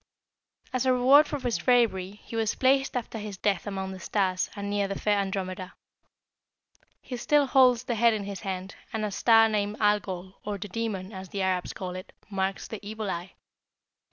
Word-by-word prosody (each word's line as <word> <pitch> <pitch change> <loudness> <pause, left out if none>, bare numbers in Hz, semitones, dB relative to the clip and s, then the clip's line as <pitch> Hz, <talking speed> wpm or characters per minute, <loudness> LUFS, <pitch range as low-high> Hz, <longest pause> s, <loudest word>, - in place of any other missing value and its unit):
"As 255 0 0
a 255 - +5
reward 265 +4 +6
for 290 - -3
his 245 -3 -1
bravery, 220 -7 +2
he - - -9
was 225 -2 0
placed 270 0 +2
after 230 -2 -5
his 210 -2 -6
death 200 0 0
among 190 -1 -3
the 190 - -8
stars, 185 -1 0
and 200 0 -4
near 205 0 0
the 195 - -4
fair 205 -1 +2
Andromeda. 185 -2 -3 1.3
He 255 - -6
still 290 +4 +3
holds 255 -3 +5
the 250 - -2
head 230 0 +4
in 210 - -3
his 200 -1 -6
hand, 190 +1 -5 0.2
and 220 -2 -2
a 210 - -3
star 225 +2 +5
named 210 -1 -1
Algol, 195 -3 0
or 205 -1 -3
the 205 +1 -7
Demon, 205 -2 -3
as 190 -1 -8
the 195 -1 -2
Arabs 185 -1 0
call 180 -1 -6
it, 185 - -9 0.2
marks 195 0 -2
the 220 - -6
evil 215 -1 -4
eye. 175 +2 -5
205 Hz, 190 wpm, -27 LUFS, 190-230 Hz, 1.3 s, reward